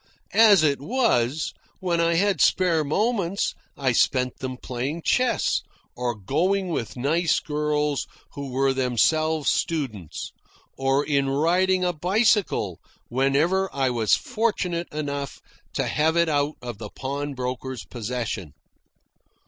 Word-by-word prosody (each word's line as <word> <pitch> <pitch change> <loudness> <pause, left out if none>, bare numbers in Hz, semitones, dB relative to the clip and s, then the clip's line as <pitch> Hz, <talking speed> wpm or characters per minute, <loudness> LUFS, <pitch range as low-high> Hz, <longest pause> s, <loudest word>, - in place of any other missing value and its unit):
As 210 -6 +7
it 145 -2 +2
was, 155 - +1 0.3
when 175 -2 0
I 170 0 +2
had 195 -1 +2
spare 170 -4 +3
moments 200 +3 0 0.2
I 135 -2 +1
spent 125 +1 +1
them 130 -1 -4
playing 135 +7 -4
chess, 255 0 +2 0.3
or 120 -1 -2
going 180 - 0
with 125 -7 -3
nice 155 +6 +2
girls 150 -1 -1 0.3
who 140 -1 -6
were 135 +1 +2
themselves 150 +5 +2
students, 115 - -3 0.4
or 135 +2 +1
in 140 -2 +1
riding 180 +6 +2
a 180 - +1
bicycle 185 - +1 0.3
whenever 145 +9 +2
I 135 -2 0
was 115 -3 +3
fortunate 205 -8 -2
enough 145 -2 -4 0.3
to - - 0
have 160 +2 +1
it 170 -1 +3
out 145 0 +1
of 120 -4 -6
the 105 -2 -6
pawnbroker's 130 -2 -4
possession. 115 - -4
150 Hz, 125 wpm, -24 LUFS, 130-175 Hz, 0.4 s, As